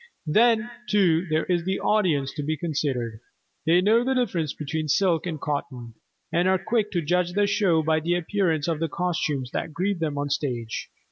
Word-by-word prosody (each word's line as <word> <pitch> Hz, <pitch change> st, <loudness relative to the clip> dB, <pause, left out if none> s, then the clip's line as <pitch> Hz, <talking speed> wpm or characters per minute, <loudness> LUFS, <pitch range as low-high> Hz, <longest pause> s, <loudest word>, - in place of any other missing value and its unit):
Then, 225 Hz, +7 st, +3 dB, 0.2 s
too, 185 Hz, -4 st, +3 dB
there 155 Hz, 0 st, +1 dB
is 175 Hz, -2 st, 0 dB
the 190 Hz, +2 st, -1 dB
audience 160 Hz, -11 st, +1 dB
to 150 Hz, -, -4 dB
be 155 Hz, +2 st, -2 dB
considered. 135 Hz, -8 st, -2 dB, 0.5 s
They 175 Hz, +2 st, +5 dB
know 220 Hz, +5 st, +4 dB
the 265 Hz, +1 st, 0 dB
difference 180 Hz, -, 0 dB
between 155 Hz, +1 st, -4 dB
silk 175 Hz, +2 st, +2 dB
and 160 Hz, -3 st, -4 dB
cotton, 140 Hz, -6 st, -4 dB, 0.4 s
and 175 Hz, +2 st, +2 dB
are 190 Hz, 0 st, +4 dB
quick 210 Hz, +3 st, 0 dB
to 175 Hz, -2 st, 0 dB
judge 175 Hz, +3 st, +1 dB
the 205 Hz, +1 st, +3 dB
show 190 Hz, -5 st, +2 dB
by 160 Hz, 0 st, +2 dB
the 170 Hz, +3 st, 0 dB
appearance 175 Hz, -4 st, 0 dB
of 165 Hz, -3 st, -1 dB
the 165 Hz, 0 st, -1 dB
costumes 150 Hz, -7 st, -2 dB
that 155 Hz, -, -3 dB
greet 190 Hz, +2 st, -1 dB
them 150 Hz, -3 st, -2 dB
on 145 Hz, -, -1 dB
the 145 Hz, -, -5 dB
stage. 125 Hz, -6 st, -3 dB
165 Hz, 195 wpm, -25 LUFS, 150-190 Hz, 0.5 s, They